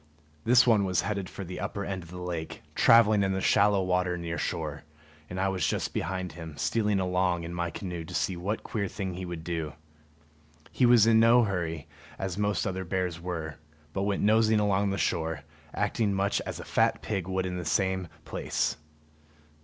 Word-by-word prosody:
This 125 +2 +6
one 110 -4 +4
was 95 -2 +1
heading 100 -1 -2
for 100 - -7
the 90 +1 -6
upper 100 -1 -3
end 95 -2 -3
of 85 - -13
the 90 - -8
lake, 85 -3 -5
traveling 110 -3 +6
in 95 -1 +1
the 95 - -1
shallow 100 0 +3
water 90 -1 +1
near 85 -1 -4
shore; 75 -2 -3 0.5
and 90 - -5
I 95 - +2
was 95 -5 0
just - - -1
behind 90 0 -2
him, 80 -3 -9
stealing 105 0 +1
along 90 -2 +1
in 85 +1 -6
my 85 0 -2
canoe 85 0 -5
to - - -8
see 95 - 0
what 95 +5 -3
queer 100 -3 -2
thing 95 -1 -4
he 90 +1 -5
would 85 -2 -6
do. 80 -3 -3 1.0
He 125 - +3
was 120 -3 +7
in 115 0 +5
no 115 +2 +6
hurry, 85 -7 -2 0.3
as 95 -2 -3
most 105 0 0
other 95 -1 -2
bears 90 -2 -2
were, 80 -3 -4 0.4
but 95 - -1
went 100 0 0
nosing 110 +1 +4
along 100 -1 +1
shore, 80 -5 -1 0.3
acting 105 -4 0
much 100 +1 +1
as - - -5
a - - -7
fat - - +1
pig 95 -5 -2
would 95 0 -1
in 90 0 -3
the - - -4
same 95 +2 0 0.2
place. - - -1
95 Hz, 195 wpm, -28 LUFS, 85-100 Hz, 1.0 s, was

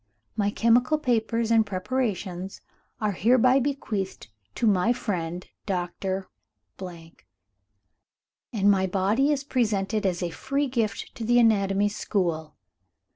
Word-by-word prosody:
My 205 -2 +1
chemical 240 +7 +3
papers 230 -4 0
and 225 -1 +5
preparations 195 -3 -3 0.4
are 215 -1 0
hereby 250 +6 +4
bequeathed 220 - -3 0.3
to - - 0
my 210 +2 +3
friend 180 -6 -3 0.2
Doctor, 190 0 -2 0.6
and 105 - -6
my 190 -1 +2
body 205 +10 +2
is 285 -2 0
presented 215 -5 0
as 180 -1 -1
a 175 - -2
free 275 - -1
gift 230 -5 -2
to 230 - -7
the 240 +2 +3
anatomy 205 -3 +3
school. 170 -7 -2
205 Hz, 115 wpm, -26 LUFS, 180-235 Hz, 0.6 s, and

